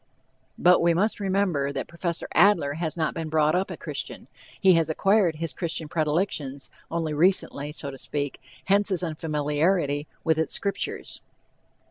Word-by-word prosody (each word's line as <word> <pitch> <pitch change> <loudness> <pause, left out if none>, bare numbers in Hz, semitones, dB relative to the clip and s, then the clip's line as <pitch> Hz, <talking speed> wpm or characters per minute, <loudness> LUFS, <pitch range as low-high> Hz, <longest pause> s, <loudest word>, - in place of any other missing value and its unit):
But 180 0 +5
we 170 0 +3
must 210 +6 +1
remember 190 -8 0
that - - -4
Prof. 170 0 -3
Adler 175 -6 +4
has 160 +1 -3
not 155 -2 0
been 165 -1 -4
brought 155 0 +3
up 185 +2 0
a - - -6
Christian. - - -6 0.3
He 190 -2 +6
has 165 -2 +2
acquired 195 +1 +3
his 160 -2 -4
Christian 165 +1 -3
predilections 150 -3 -1 0.2
only 165 -2 -2
recently, 150 -3 +2
so 140 -2 -5
to 135 - -10
speak, 145 -2 -4 0.2
hence 200 +2 +3
his 185 -2 0
unfamiliarity 150 -1 0 0.2
with 160 -1 +2
its 160 - 0
Scriptures. 200 -1 -3
165 Hz, 155 wpm, -26 LUFS, 150-185 Hz, 0.3 s, He